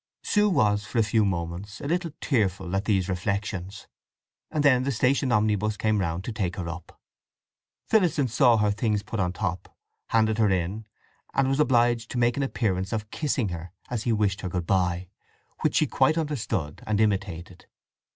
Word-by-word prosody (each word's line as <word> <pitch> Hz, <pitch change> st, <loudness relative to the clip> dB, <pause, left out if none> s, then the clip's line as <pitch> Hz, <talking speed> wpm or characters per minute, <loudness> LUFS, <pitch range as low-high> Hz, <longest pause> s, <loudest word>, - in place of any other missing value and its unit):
Sue 210 Hz, 0 st, +3 dB
was 105 Hz, -, +2 dB
for 115 Hz, -, -6 dB
a 115 Hz, -, +5 dB
few 110 Hz, +1 st, +2 dB
moments 95 Hz, +2 st, -3 dB
a -, -, -7 dB
little 175 Hz, +2 st, 0 dB
tearful 95 Hz, -7 st, 0 dB
at 95 Hz, +2 st, -1 dB
these 95 Hz, -4 st, +1 dB
reflections, 100 Hz, +1 st, -3 dB, 0.6 s
and 150 Hz, -, -1 dB
then 130 Hz, -3 st, +5 dB
the 135 Hz, +2 st, -1 dB
station 130 Hz, +2 st, +1 dB
omnibus 105 Hz, -1 st, +1 dB
came 110 Hz, -1 st, +1 dB
round 85 Hz, 0 st, -2 dB
to 120 Hz, -, -4 dB
take 100 Hz, -5 st, -2 dB
her 90 Hz, -3 st, -4 dB
up. 85 Hz, 0 st, -8 dB, 0.9 s
Phillotson 170 Hz, -10 st, +2 dB
saw 120 Hz, 0 st, +4 dB
her 105 Hz, -1 st, +2 dB
things 105 Hz, 0 st, 0 dB
put 115 Hz, -, -5 dB
on 90 Hz, -1 st, +1 dB
the -, -, -13 dB
top, 90 Hz, -3 st, -4 dB, 0.3 s
handed 110 Hz, -1 st, +2 dB
her 110 Hz, -2 st, +4 dB
in, 95 Hz, +4 st, -1 dB, 0.5 s
and 135 Hz, -1 st, +3 dB
was 135 Hz, +2 st, 0 dB
obliged 120 Hz, -4 st, +3 dB
to -, -, -4 dB
make 120 Hz, 0 st, +2 dB
an 140 Hz, -, -1 dB
appearance 100 Hz, -8 st, -1 dB
of 110 Hz, -2 st, -3 dB
kissing 135 Hz, -8 st, -1 dB
her 85 Hz, 0 st, -7 dB, 0.2 s
as 120 Hz, -3 st, -1 dB
he 120 Hz, -, 0 dB
wished 105 Hz, -2 st, +1 dB
her 90 Hz, -, -3 dB
good 90 Hz, -1 st, -3 dB
bye, 90 Hz, -1 st, 0 dB, 0.5 s
which -, -, 0 dB
she -, -, +4 dB
quite 155 Hz, -, +2 dB
understood 120 Hz, -, -2 dB
and 105 Hz, -1 st, +1 dB
imitated. 95 Hz, -5 st, -2 dB
105 Hz, 185 wpm, -26 LUFS, 95-120 Hz, 0.9 s, a